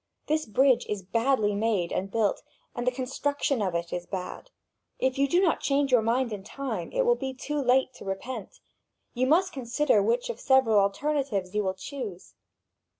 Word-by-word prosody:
This 310 -1 0
bridge 260 +4 +3
is 205 -2 -3
badly 225 +1 +1
made 205 -4 0
and 195 +1 -2
built, 215 0 0 0.3
and 240 0 -4
the - - +4
construction 275 0 -1
of 185 -4 -1
it 170 0 -3
is 175 0 -4
bad. 190 - -6 0.5
If 260 0 0
you 280 - +4
do 345 +6 +3
not 365 -4 +2
change 280 -1 +1
your 245 -3 +5
mind 235 +1 0
in 200 -2 -6
time, 275 +6 -5
it - - +1
will 485 - +5
be 265 - -4
too 295 +2 -3
late 260 0 +2
to - - -11
repent. 195 +3 -6 0.5
You 255 +1 +1
must 365 +6 +3
consider 260 -2 +2
which 235 +3 0
of 230 - -11
several 260 -6 +4
alternatives 200 -2 0
you 210 - +1
will 190 -1 -1
choose. 205 -3 -7
245 Hz, 185 wpm, -27 LUFS, 205-275 Hz, 0.5 s, your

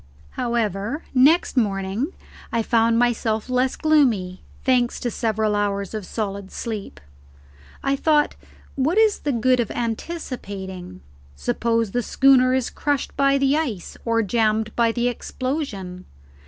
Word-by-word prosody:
However, 235 - -2
next 280 +7 +4
morning 205 - 0 0.4
I 230 -1 +1
found 230 0 +3
myself 230 -2 0
less 255 +1 +1
gloomy, 240 - +2 0.2
thanks 250 -2 +2
to 240 - -1
several 220 -2 0
hours 200 -1 -1
of 215 -3 -5
solid 200 -3 -4
sleep. 215 -4 -5 0.8
I 275 - +2
thought, 295 +1 +2 0.4
what 290 +8 0
is 440 -2 +4
the 290 - -1
good 250 +1 +2
of 235 - 0
anticipating? 200 - -5 0.3
Suppose 230 - 0
the 245 - 0
schooner 255 +1 +4
is 260 -2 -1
crushed 290 -2 -2
by 275 0 +3
the 275 +1 +2
ice 255 - -3
or 230 -1 +1
jammed 220 +1 0
by 230 -1 +3
the 240 +1 0
explosion? 240 - -4
235 Hz, 130 wpm, -23 LUFS, 210-265 Hz, 0.8 s, next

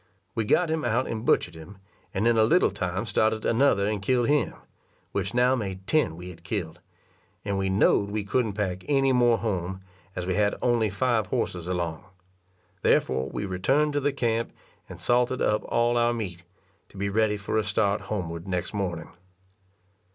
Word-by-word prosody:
We 115 -2 -1
got 165 +9 +2
him 160 -1 -1
out 125 +1 +1
and 110 -1 -4
butchered 85 - +2
him, 80 +5 -12 0.3
and 105 +4 0
in 120 - +4
a 110 - +5
little 170 +11 +4
time 95 +3 -3
started 110 -1 +1
another 115 -5 +3
and 105 -2 -1
killed 120 +4 +1
him, 150 0 +1 0.6
which 100 +3 -2
now 125 +1 +4
made 95 -5 -5
ten 150 - +1
we 90 +2 -8
had 85 -1 -15
killed; 90 -4 -4 0.7
and 100 -1 -1
we 95 0 0
know'd 100 +1 +3
we 105 0 -2
couldn't 110 +1 0
pack 95 -3 -2
any 135 -2 +3
more 120 -2 +4
home, 95 -4 -3 0.3
as 90 - -3
we 90 - 0
had 105 +1 +2
only 120 -3 +2
five 110 +1 0
horses 90 -1 -2
along; 85 -3 -2 0.8
therefore 65 +1 +2
we 105 - -4
returned 135 +11 +1
to 145 - +1
the 145 +1 +1
camp 115 -4 -1 0.4
and - - -9
salted 125 +1 +1
up 105 0 +2
all 120 0 +1
our 120 0 +2
meat, 90 -7 -5 0.5
to - - -15
be 100 +1 -1
ready 105 +1 +1
for 105 +2 -1
a - - 0
start 100 0 +1
homeward 85 -4 -4
next 90 +1 -2
morning. 95 -4 -3
105 Hz, 180 wpm, -26 LUFS, 95-120 Hz, 0.8 s, a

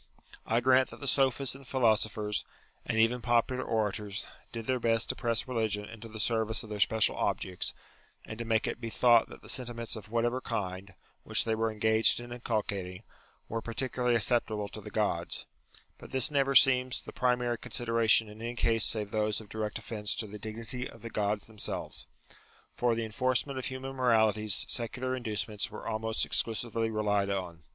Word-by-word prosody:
I 115 +2 +2
grant 130 +1 +4
that - - -11
the 140 - -5
sophists 135 -1 +2
and 135 0 -10
philosophers, 110 -4 +1 0.4
and - - -1
even 115 +2 +3
popular 120 +2 +1
orators, 105 -1 -2 0.3
did 115 -1 -5
their 130 +1 0
best 115 -1 +1
to - - 0
press 115 -1 -1
religion 110 -4 -1
into 110 +2 -10
the 110 0 -9
service 110 0 +1
of 110 - -11
their 105 - -4
special 110 +3 +3
objects, 90 -1 -1 0.5
and 110 - -8
to - - -2
make 110 -1 +1
it - - -4
be 115 - -3
thought 120 0 +4
that - - -12
the - - -12
sentiments 120 -2 -2
of 105 -2 -9
whatever 120 +2 0
kind, 95 -4 -4 0.3
which - - +2
they 110 - 0
were 110 0 0
engaged 110 +2 +4
in 120 0 -9
inculcating, 105 -5 -3 0.4
were 115 0 -3
particularly 125 +1 -1
acceptable 110 -2 +2
to - - -9
the - - -8
Gods, - - -1 0.5
but - - -11
this 130 +2 +3
never 140 -1 +2
seems 130 -2 +5
the - - -9
primary 125 -1 +1
con - - -10
sideration 115 -2 +4
in 105 +1 -11
any 120 +1 -4
case 115 -2 +2
save 105 -2 +3
those 110 -1 0
of 110 -2 -12
direct 110 -1 -3
offence 105 -2 -2
to 115 - -2
the 105 0 -9
dignity 115 +4 -6
of - - -15
the 115 - -6
Gods 105 -1 -1
themselves. 110 -2 -4 0.7
For 120 -1 +1
the 115 0 -2
enforcement 130 +4 0
of 130 - -4
human 135 +1 -5
moralities 110 -4 +3
secular 130 +2 -2
inducements 110 -3 -2
were - - -8
almost 110 +1 0
exclusively 115 0 0
relied 105 -2 +1
on. 90 -4 -3
115 Hz, 180 wpm, -30 LUFS, 105-120 Hz, 0.7 s, seems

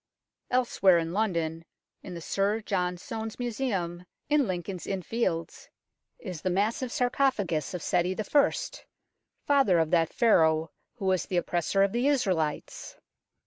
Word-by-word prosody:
Elsewhere 215 -7 +3
in 165 0 -2
London, 170 -6 -1 0.4
in 180 - -8
the 170 - -7
Sir 200 +6 0
John 180 -4 -1
Soane's 220 +4 -6
Museum 200 -8 -3 0.2
in 295 -4 +3
Lincoln's 180 0 -4
Inn 190 -2 -2
Fields, 180 -8 -2 0.5
is 180 -7 -7
the 185 - -1
massive 215 +7 0
sarcophagus 245 - 0
of 175 - -5
Seti 180 0 +1
I., 280 +6 +3 0.9
father 270 -11 +4
of 160 -1 +1
that 165 -2 +3
Pharaoh 160 -8 +3 0.2
who 215 -5 -6
was 185 -1 +1
the 180 - -1
Oppressor 175 +3 +1
of 200 - +2
the 240 +5 +1
Israelites. 185 - -1
190 Hz, 140 wpm, -28 LUFS, 170-230 Hz, 0.9 s, father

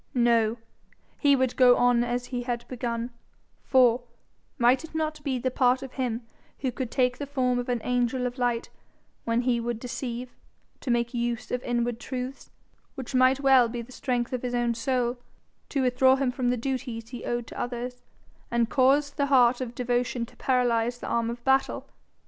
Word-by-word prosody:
No; 235 -2 +3 0.6
he 285 -2 +5
would 260 -2 0
go 250 -1 +6
on 245 -1 +4
as 245 +1 -2
he 245 -1 -4
had 240 -1 -4
begun; 235 -1 -3 0.5
for, 250 -2 +4 0.6
might 250 +2 +4
it 320 - -11
not 310 -1 -2
be 270 -2 -1
the 255 +1 -1
part 255 +1 +2
of 265 - -8
him 245 -3 -2 0.4
who 260 -2 0
could 255 -1 -4
take 250 0 +1
the 285 - -4
form 255 -3 0
of 245 - -4
an 240 -2 0
angel 250 0 0
of 250 +1 -4
light 240 -1 -1 0.5
when 230 +1 +1
he 245 -1 +1
would 235 -1 -3
deceive, 245 0 -5 0.5
to 265 - -6
make 235 0 +1
use 240 0 -2
of 250 - -1
inward 240 -1 -1
truths, 255 +1 -6 0.5
which 265 -2 -7
might 255 +1 +4
well 265 -4 +5
be 235 0 -4
the 245 - -15
strength 245 -2 -2
of 250 - -2
his 245 -1 -2
own 240 -1 +1
soul, 245 +1 -1 0.5
to 275 -2 0
withdraw 260 +1 +4
him 265 -2 0
from 250 -1 -1
the 250 - +1
duties 240 -2 -4
he 245 - -7
owed 240 -1 -2
to - - -9
others, 245 0 -4 0.5
and 235 -1 +1
cause 280 +2 +3
the 280 0 -1
heart 255 -2 +4
of 245 -1 -5
devotion 245 0 -1
to - - -19
paralyze 245 -2 +1
the - - -7
arm 230 -1 0
of 235 0 -6
battle? 265 0 +1
245 Hz, 190 wpm, -27 LUFS, 240-260 Hz, 0.6 s, go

